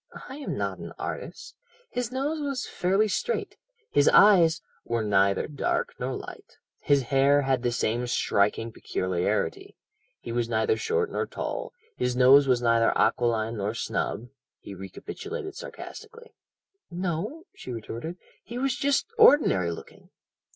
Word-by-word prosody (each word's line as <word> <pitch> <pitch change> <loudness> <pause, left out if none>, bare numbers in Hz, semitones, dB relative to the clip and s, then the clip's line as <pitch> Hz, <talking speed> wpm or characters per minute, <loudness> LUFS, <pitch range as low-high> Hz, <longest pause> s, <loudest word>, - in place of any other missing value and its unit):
"I 265 - -8
am 290 - -4
not - - -3
an - - -8
artist. - - -6 0.4
His 245 -1 -3
nose 290 +4 -2
was 275 -3 -2
fairly 195 +4 +1
straight 470 - -2 0.4
his 145 0 +4
eyes 175 -6 +6
" - - -36
"Were 115 -1 -1
neither 100 -1 +2
dark 145 -2 -1
nor - - -2
light - - -10 0.2
his 140 -2 +2
hair 140 +3 +3
had 135 -2 +1
the 120 -1 0
same 120 +1 -1
striking 115 0 +1
peculiarity 90 -4 -2 0.4
he 115 - -7
was 120 0 -1
neither 110 -1 +2
short 450 -1 -1
nor - - -2
tall - - -4 0.3
his 125 0 0
nose 135 +2 +6
was 125 -2 +2
neither 115 -1 +4
aquiline 115 -1 +1
nor 105 +2 -2
snub 120 +1 -3
" - - -66
he 100 - -8
recapitulated 390 - -7
sarcastically. 470 -1 -10 0.6
"No," 185 - -3
she 130 - -9
retorted; 120 +8 -6 0.3
"he 235 +3 -7
was 265 0 0
just 280 0 +1
ordinary 285 - +6
looking." 85 - -11
140 Hz, 145 wpm, -27 LUFS, -, 0.6 s, eyes